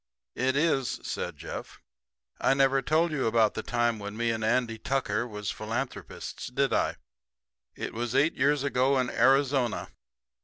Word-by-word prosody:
"It 130 +1 0
is," 140 -4 +1
said - - -4
Jeff. - - -7 0.6
"I 135 - +3
never 135 0 +3
told 155 +5 +2
you 135 -6 0
about 110 -1 +3
the - - -3
time 120 -2 0
when 100 +1 -6
me 120 0 +1
and 110 -1 -3
Andy 115 0 +1
Tucker 120 -3 -1
was 105 -3 -4
philanthropists, 115 +5 -5
did - - 0
I? - - +1 0.8
It - - -5
was 120 +2 -3
eight 145 +4 +4
years 145 -1 +2
ago 135 0 +2
in 125 -1 0
Arizona. 135 -3 +2
125 Hz, 155 wpm, -28 LUFS, 115-135 Hz, 0.8 s, eight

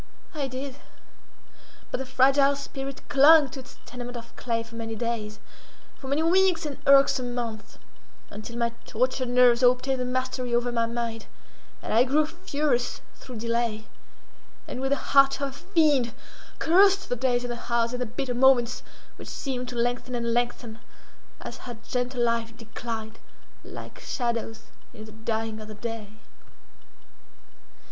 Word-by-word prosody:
I 290 -3 -2
did; 265 +1 -6 1.1
but - - -2
the 265 - -5
fragile 275 +2 +4
spirit 275 -1 -7
clung 290 +1 +7
to 270 - -8
its 260 - -13
tenement 245 0 -7
of 230 0 -11
clay 230 -2 -2
for 230 0 -17
many 225 -1 -5
days—for 225 +3 -7
many 285 +4 +1
weeks 360 0 +3
and 290 -2 -5
irksome 275 -3 +5
months, 225 -3 -5 0.5
until 215 +3 -8
my 235 -1 +1
tortured 255 +2 -1
nerves 245 0 +5
obtained 255 +1 +3
the 250 - -1
mastery 255 -1 -1
over 240 +1 +1
my 230 -1 +1
mind, 230 -1 -4 0.6
and - - -3
I 230 +3 +6
grew 290 +4 +2
furious 300 -7 -1
through 255 - -11
delay, 230 -1 -1 0.8
and, 255 - -5
with 270 - 0
the 280 - +3 0.2
heart 275 -1 +6
of 280 -1 -1
a - - -10
fiend, 295 - +2 0.4
cursed 390 +3 +4
the 245 - +1
days 245 0 +1
and 245 -1 -3
the 235 - -8
hours 235 0 +2
and 250 - -3
the 250 - -1
bitter 250 +2 -3
moments, 250 -1 +4 0.4
which - - -10
seemed 250 -3 -4
to 250 - -7
lengthen 245 +1 -1
and 235 -1 -1
lengthen 240 -1 -2 0.6
as - - -7
her 240 - -7
gentle 250 -1 -1
life 230 -1 -1
declined—like 225 -1 -9
shadows 235 -3 -3 0.3
in 215 -2 -9
the 220 - -12
dying 220 0 -3
of 215 - -9
the 215 - -9
day. 225 -2 -6
245 Hz, 155 wpm, -26 LUFS, 230-270 Hz, 1.1 s, clung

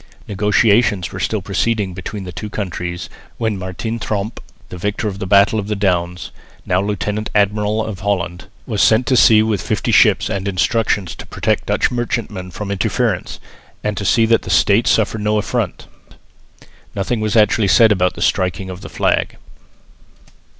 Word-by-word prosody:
Negotiations 105 -1 +2
were 95 - -7
still 100 +1 -1
proceeding 100 0 -1
between 95 +3 -6
the 90 - -7
two 105 +5 -6
countries, 90 -4 -4 0.3
when 110 -2 -1
Martin 95 +5 -4
Tromp, 105 +1 -3 0.3
the 90 - -8
victor 105 +3 -2
of 100 -1 -5
the 95 - -4
battle 100 +3 +4
of 100 - -4
the 105 - -1
Downs, 90 -3 -1 0.3
now 90 +1 +1
lieutenant 105 +1 -2
admiral 105 +1 +1
of 105 -4 -6
Holland, 90 -3 -2 0.2
was 110 -5 -1
sent 110 +3 +4
to 130 - +2
sea 110 -3 +6
with 110 -3 -1
fifty - - -1
ships - - +4
and 100 0 -3
instructions 95 0 0
to - - -11
protect - - -1
Dutch - - +1
merchantmen 115 -6 -3
from 100 +3 -6
interference, 110 0 -1 0.4
and 105 -1 -1
to 100 - -4
see 115 +3 +3
that 115 0 +3
the - - -9
States 105 +3 +3
suffered 110 0 +1
no 105 +1 +1
affront. 105 - -2 1.1
Nothing 100 +4 -1
was 110 -1 -1
actually 105 -1 +3
said 110 +3 +5
about 90 -3 +1
the - - -2
striking 95 0 0
of 90 +1 -9
the - - -9
flag. - - 0
105 Hz, 170 wpm, -18 LUFS, 95-110 Hz, 1.1 s, sea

